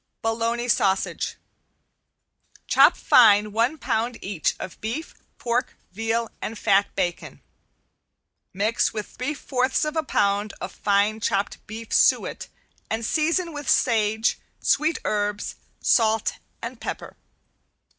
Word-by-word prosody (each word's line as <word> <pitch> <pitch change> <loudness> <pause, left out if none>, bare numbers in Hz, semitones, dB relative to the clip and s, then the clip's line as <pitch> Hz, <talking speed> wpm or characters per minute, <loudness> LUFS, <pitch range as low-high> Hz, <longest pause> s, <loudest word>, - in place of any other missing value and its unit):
~BOLOGNA 230 +2 -1
SAUSAGE~ 195 -4 +1 1.3
Chop - - +5
fine 210 -3 +5
one 235 +8 +1
pound 235 -3 -1
each 190 -5 -1
of 185 - -8
beef, 240 +9 -4 0.2
pork, 240 +1 -1 0.2
veal 225 +3 -1
and 225 - -4
fat 200 0 +2
bacon. 175 -1 -3 1.1
Mix 210 +6 0
with 215 -2 -3
three 280 +5 -4
fourths 260 0 0
of 305 +1 -3
a 320 - +2
pound 205 -6 0
of - - -5
fine 205 +2 +1
chopped 200 -1 -1
beef 220 +2 -7
suet - - +2 0.4
and 225 +1 -2
season 330 +5 0
with 290 -1 -5
sage, 220 -2 +2 0.2
sweet 310 +3 +2
herbs, 205 -1 -1 0.3
salt 220 -2 +2 0.2
and - - -6
pepper. - - -6
225 Hz, 115 wpm, -24 LUFS, 205-250 Hz, 1.3 s, Chop